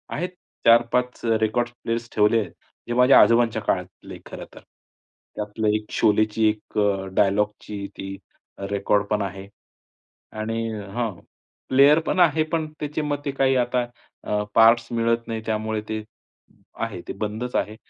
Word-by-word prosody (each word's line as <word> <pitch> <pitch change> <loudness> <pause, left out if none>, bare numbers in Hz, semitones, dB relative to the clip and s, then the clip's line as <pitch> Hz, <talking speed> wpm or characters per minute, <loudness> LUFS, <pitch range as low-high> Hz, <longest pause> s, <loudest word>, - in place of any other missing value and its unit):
आहेत 180 +4 -2 0.4
4-5 120 +2 +3
अ, 115 -1 +3
records 120 +2 0
players 115 0 -3
ठेवले, 105 +1 +3 0.4
जे 120 - -2
माझ्या 125 +2 +7
आजोबांच्या 115 -1 +3
काळातले - - -4
खरं - - -8
तर. - - -11 0.8
त्यातलं 105 +1 -3
एक 105 0 -3
शोलेची 110 0 +2
एक 105 0 -6
अ, 100 -2 +1
डायलॉगची 105 0 0
ती 95 0 -6 0.5
रेकॉर्ड 100 +1 +1
पण 105 -1 +1
आहे 95 0 -5 0.9
आणि 115 +1 -2 0.2
हां, 120 -1 -1 0.6
प्लेयर 140 +4 +6
पण 185 - 0
आहे. 160 -2 +4
पण 155 0 -2
त्याचे 150 +1 -3
मग 145 -1 -1
ते 140 - -1
काही 135 -1 +2
आता 125 0 +1 0.4
अ, 105 0 0
पार्ट्स 115 +1 +6
मिळत 115 0 0
नाही, 115 -1 -3
त्यामुळे 110 0 -2
ते 110 0 -3 0.8
आहे - - -4
ते - - -4
बंदच 110 +4 -4
आहे. 105 - -1
115 Hz, 145 wpm, -23 LUFS, 105-125 Hz, 0.9 s, माझ्या